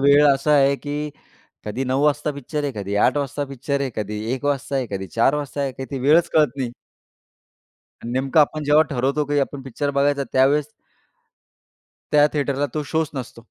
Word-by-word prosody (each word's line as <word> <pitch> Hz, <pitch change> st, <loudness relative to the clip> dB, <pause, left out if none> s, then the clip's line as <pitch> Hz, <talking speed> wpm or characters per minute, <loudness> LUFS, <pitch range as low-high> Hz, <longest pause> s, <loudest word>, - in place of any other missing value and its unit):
वेळ 140 Hz, +1 st, +6 dB
असा 140 Hz, +3 st, 0 dB
आहे 140 Hz, -1 st, +4 dB
की 150 Hz, +1 st, -4 dB, 0.5 s
कधी 110 Hz, +6 st, -3 dB
9:00 130 Hz, +2 st, 0 dB
वाजता 150 Hz, 0 st, +1 dB
पिक्चर 145 Hz, +1 st, -4 dB
आहे, 145 Hz, -1 st, -2 dB
कधी 100 Hz, -1 st, -4 dB
8:00 -, -, +3 dB
वाजता 145 Hz, 0 st, -2 dB
पिक्चर 140 Hz, +1 st, -3 dB
आहे, 135 Hz, -2 st, -1 dB
कधी 105 Hz, 0 st, -3 dB
1:00 130 Hz, -, -8 dB
वाजता 140 Hz, -1 st, -1 dB
आहे, 130 Hz, -2 st, -1 dB
कधी 95 Hz, -1 st, -4 dB
4:00 115 Hz, +7 st, +2 dB
वाजता 145 Hz, -1 st, -4 dB
आहे, 135 Hz, -2 st, -1 dB
काही 130 Hz, +1 st, -7 dB
ती 140 Hz, -, -3 dB
वेळच 150 Hz, +6 st, +4 dB
कळत 155 Hz, -1 st, +5 dB
नाही. 130 Hz, -3 st, -2 dB, 1.3 s
अन् 120 Hz, -, -5 dB
नेमकं 135 Hz, +4 st, +2 dB
आपण 155 Hz, +1 st, +2 dB
जेव्हा 150 Hz, +1 st, +5 dB
ठरवतो 140 Hz, +3 st, 0 dB
की 145 Hz, 0 st, +1 dB
आपण 140 Hz, 0 st, -2 dB
पिक्चर 140 Hz, +2 st, -3 dB
बघायचा 140 Hz, 0 st, +2 dB
त्यावेळेस 140 Hz, +3 st, +3 dB, 1.4 s
त्या 150 Hz, -1 st, +6 dB
थिएटरला 140 Hz, -1 st, 0 dB
तो 150 Hz, -, -2 dB
शोच 160 Hz, -2 st, +1 dB
नसतो. 125 Hz, -3 st, -7 dB
140 Hz, 185 wpm, -22 LUFS, 130-145 Hz, 1.4 s, वेळ